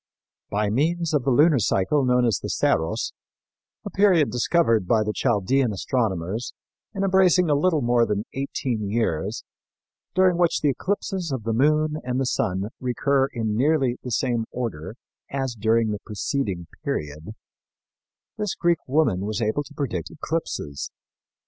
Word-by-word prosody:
By 105 0 0
means 165 +6 0
of 140 -4 +1
the - - +2
lunar 145 +2 +5
cycle 115 +8 +1
known 125 -1 +3
as 115 -6 +1
the - - -5
Saros, 80 +1 0 0.7
a - - -5
period 185 -7 +4
discovered 120 - +2
by 110 +1 +3
the 105 0 -2
Chaldean 120 +5 +1
astronomers 105 -1 -2 0.4
and 195 -3 -3
embracing 185 -3 +4
a - - +5
little 150 0 +2
more 120 -1 +3
than 105 +1 -1
eighteen 125 -6 -2
years, 105 -2 -1 0.7
during 185 -2 +4
which 175 -2 +2
the 150 - +3
eclipses 185 +2 -2
of 130 -4 -3
the 115 +1 -1
moon 150 +5 +2
and 130 +1 -1
sun 95 -2 -1
recur 135 +2 +1
in 110 -5 -2
nearly 135 -1 +2
the 125 - -6
same 120 -1 0
order 110 -6 -5 0.3
as 135 -2 -2
during 110 0 +1
the 105 - -3
preceding 105 -4 -3 0.2
period, 75 +7 -4 1.0
this 210 -2 -1
Greek 170 -2 +2
woman 140 - +2
was 110 -1 -2
able 110 +5 0
to 145 +1 -11
predict 105 - -3
eclipses. 155 - -4
125 Hz, 150 wpm, -24 LUFS, 105-150 Hz, 1.0 s, lunar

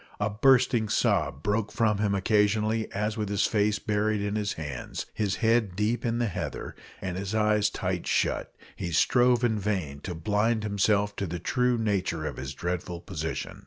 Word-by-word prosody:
A 105 0 0
bursting 120 -1 +3
sob 70 -6 +1
broke 105 +1 0
from 105 -3 +1
him 105 -1 +1
occasionally, 105 +2 +1
as 105 +2 -2
with 105 -2 -2
his 100 0 +2
face 105 -1 +2
buried 105 0 0
in 100 +1 -2
his 105 -1 -1
hands, 75 -5 -5
his 100 -3 -1
head 110 -5 +2
deep 110 +4 0
in 115 0 0
the 120 - +1
heather, 100 - -4 0.3
and 90 -1 -3
his 100 +2 -3
eyes 105 -1 +3
tight 90 -3 -3
shut, - - 0 0.2
he 85 - -4
strove 120 +8 +3
in 110 -3 +2
vain 95 -9 -2
to 90 +4 -6
blind 105 +6 +1
himself 100 0 +1
to 100 - -2
the 90 +1 -4
true 125 +7 +1
nature 95 -7 -1
of - - -4
his 65 +1 -5
dreadful 90 +1 -3
position. 80 -2 -5
105 Hz, 180 wpm, -27 LUFS, 95-110 Hz, 0.3 s, bursting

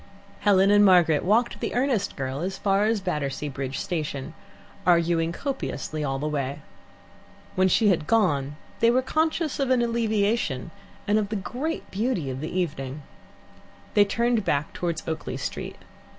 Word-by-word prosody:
Helen 200 -1 +4
and 205 0 +6
Margaret 175 -6 +5
walked 225 +6 +2
the - - -3
earnest 245 -5 0
girl 135 0 -3
as 190 +3 -3
far 200 +1 +2
as 220 -1 +1
Battersea 150 -5 -2
Bridge 135 -1 -4
Station, 155 -7 -3 0.5
arguing 170 -1 +3
copiously 170 - -4
all 135 -2 -1
the 150 +3 -2
way. 145 -1 -3 0.9
When 185 0 +3
she 210 +3 +4
had 160 -5 +1
gone 145 -11 +2 0.2
they 230 - +5
were 255 +2 +3
conscious 315 +2 0
of 270 -2 +1
an 255 -2 +3
alleviation, 220 - 0 0.4
and 210 +1 +3
of 205 -2 -2
the 215 - -2
great 260 - -4
beauty 195 - -1
of 130 +1 -5
the 155 - -4
evening. 145 -6 -3 0.9
They 205 - +6
turned 235 +1 +1
back 145 -4 -1
towards 170 -2 -3
Oakley 160 -1 -3
Street. - - -5
185 Hz, 155 wpm, -25 LUFS, 150-225 Hz, 0.9 s, and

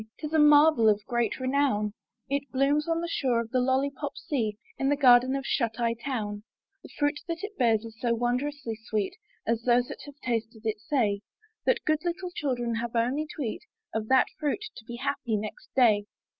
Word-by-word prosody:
Tis 305 0 -6
a 315 - +4
marvel 295 -5 +6
of 205 -1 +1
great 240 0 0
renown: 255 -6 +1 0.3
It 280 0 -2
blooms 285 +3 +2
on 330 0 +1
the 340 - -2
shore 260 -7 +1
of 230 -1 -4
the 255 - +2
LoUypop 275 +2 0
sea 220 -8 -2 0.2
In 270 - +1
the 290 - +3
garden 255 -1 +6
of 275 0 -3
Shut 230 -2 0
Eye 230 -1 +2
Town; 225 -4 -4 0.4
The - - -13
fruit 290 0 +1
that 335 +2 -4
it 415 0 -5
bears 230 - +2
is 225 0 -11
so 235 -2 +2
wondrously 245 0 -2
sweet 210 -3 -1 0.3
(As 230 0 0
those 245 +1 +3
that - - -7
have 290 0 -11
tasted 225 -2 -3
it 220 -1 -1
say) 215 -7 0 0.5
That - - +2
good 310 0 +1
little 355 +1 -3
children 245 -7 -1
have 235 0 -4
only 255 +7 +1
to 295 - -3
eat 225 - -3 0.3
Of 220 -1 -2
that 260 +1 +5
fruit 305 +8 -1
to 220 - -11
be 240 - -7
happy 235 -2 -1
next 210 +1 -7
day. 215 -5 +4
250 Hz, 200 wpm, -28 LUFS, 225-290 Hz, 0.5 s, marvel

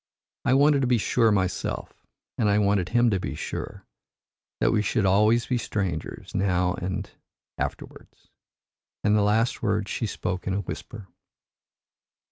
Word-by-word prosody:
I 130 - +4
wanted 145 0 +4
to 130 - +1
be 125 -1 +3
sure 115 +1 +2
myself, 95 -3 -2 0.3
and 105 - +1
I 100 - +3
wanted 100 -3 +2
him 120 -1 +3
to 95 - +1
be 70 -5 -4
sure, - - -6 0.7
that - - +3
we 105 - +2
should 105 0 0
always 105 +5 +4
be 125 -2 0
strangers 95 -9 -4
now 90 -2 +1
and - - -7 0.2
and - - -21 0.5
afterwards," - - -7 0.7
and 105 0 +3
the 105 - +4
last 110 +3 +1
words 105 -2 0
she 115 - -2
spoke 90 -2 -4
in 95 - 0
a 100 - 0
whisper. 105 0 -8
105 Hz, 155 wpm, -26 LUFS, 95-115 Hz, 0.7 s, I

